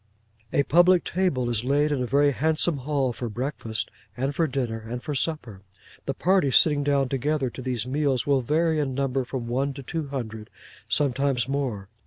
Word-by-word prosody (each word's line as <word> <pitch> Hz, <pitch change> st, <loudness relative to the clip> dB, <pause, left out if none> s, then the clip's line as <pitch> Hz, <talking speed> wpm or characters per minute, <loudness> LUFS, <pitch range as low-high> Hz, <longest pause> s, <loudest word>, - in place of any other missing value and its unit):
A 140 Hz, -, +3 dB
public 175 Hz, +3 st, +5 dB
table 165 Hz, -9 st, 0 dB
is 120 Hz, -2 st, -1 dB
laid 145 Hz, +3 st, +2 dB
in 140 Hz, -3 st, 0 dB
a 125 Hz, -, -1 dB
very 145 Hz, +3 st, +3 dB
handsome 155 Hz, +4 st, +1 dB
hall 135 Hz, -2 st, -1 dB
for 120 Hz, 0 st, -5 dB
breakfast, 120 Hz, -1 st, -3 dB, 0.3 s
and 135 Hz, +3 st, -1 dB
for 165 Hz, +3 st, +1 dB
dinner, 125 Hz, -5 st, -2 dB
and 115 Hz, +3 st, -6 dB
for 150 Hz, -, -3 dB
supper. 130 Hz, -, -2 dB, 0.5 s
The 135 Hz, -, -1 dB
party 185 Hz, -3 st, +2 dB
sitting 145 Hz, +2 st, +4 dB
down 140 Hz, -2 st, +2 dB
together 135 Hz, 0 st, -1 dB
to 130 Hz, -, -8 dB
these 125 Hz, -3 st, -2 dB
meals 135 Hz, -1 st, 0 dB
will 140 Hz, -2 st, +2 dB
vary 160 Hz, +5 st, +1 dB
in 135 Hz, -3 st, -1 dB
number 135 Hz, -1 st, 0 dB
from 125 Hz, -1 st, -5 dB
one 135 Hz, +3 st, -1 dB
to 140 Hz, -, -8 dB
two 160 Hz, +2 st, -4 dB
hundred: 110 Hz, -6 st, -6 dB, 0.4 s
sometimes 135 Hz, -3 st, +1 dB
more. 130 Hz, -8 st, -2 dB
135 Hz, 185 wpm, -25 LUFS, 125-150 Hz, 0.5 s, public